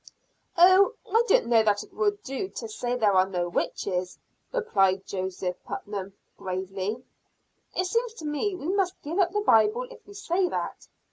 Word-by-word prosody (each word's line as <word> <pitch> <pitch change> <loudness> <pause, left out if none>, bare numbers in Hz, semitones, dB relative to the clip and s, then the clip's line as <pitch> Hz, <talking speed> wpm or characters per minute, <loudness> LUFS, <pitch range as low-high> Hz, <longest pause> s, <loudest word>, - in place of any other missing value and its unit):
"Oh, 375 +6 +6
I 455 +1 +3
don't - - +4
know 235 -1 +5
that 210 -2 +1
it - - -18
will 415 -1 +1
do 270 +9 -4
to 455 - -6
say 250 - -3
there 215 -5 +3
are 185 0 +4
no 175 -2 -1
witches," 180 +1 -2 0.3
replied 195 - +1
Joseph 185 -1 -4
Putnam 200 -2 -6 0.2
gravely. 190 +5 -4 0.7
"It 370 - +1
seems 465 +4 -1
to 320 - -8
me 300 +7 -1
we 330 -4 -6
must 380 -1 0
give 330 +6 -3
up 355 -2 +3
the 415 +1 0
Bible 420 - +4
if 480 - -12
we 405 - -13
say 365 -2 0
that. - - -4
290 Hz, 175 wpm, -27 LUFS, -, 0.7 s, Oh